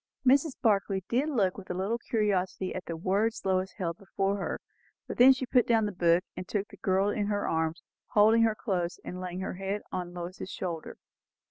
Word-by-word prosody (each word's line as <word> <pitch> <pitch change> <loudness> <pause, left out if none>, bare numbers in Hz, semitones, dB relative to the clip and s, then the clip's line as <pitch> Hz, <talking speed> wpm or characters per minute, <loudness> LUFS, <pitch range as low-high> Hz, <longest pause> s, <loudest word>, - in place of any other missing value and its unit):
Mrs. 275 +3 +4
Barclay 200 -3 +2
did 265 +6 +1
look 205 -9 +1
with 190 - -12
a 180 - -2
little 200 +6 -1
curiosity 195 -5 -1
at 185 -1 -5
the 165 - -4
words 200 +7 0
Lois 190 0 +1
held 170 -4 -4
before 195 0 -1
her, 195 - -3 0.5
but - - -5
then 255 +2 +9
she 260 0 0
put 250 0 +3
down 225 -2 +3
the 205 - -2
book 175 -1 +3
and 185 - -6
took 205 -1 -2
the 200 - -13
girl 190 +2 +2
in 205 0 -1
her 205 -1 -1
arms, 160 +1 -1 0.2
holding 220 +2 +5
her 225 -1 +3
close 180 -6 -2
and 180 +1 -6
laying 180 0 -4
her 190 - -3
own - - -8
head 195 +2 -3
on 180 -1 -4
Lois's 180 +2 -6
shoulder. 170 -5 -5
195 Hz, 210 wpm, -29 LUFS, 180-215 Hz, 0.5 s, then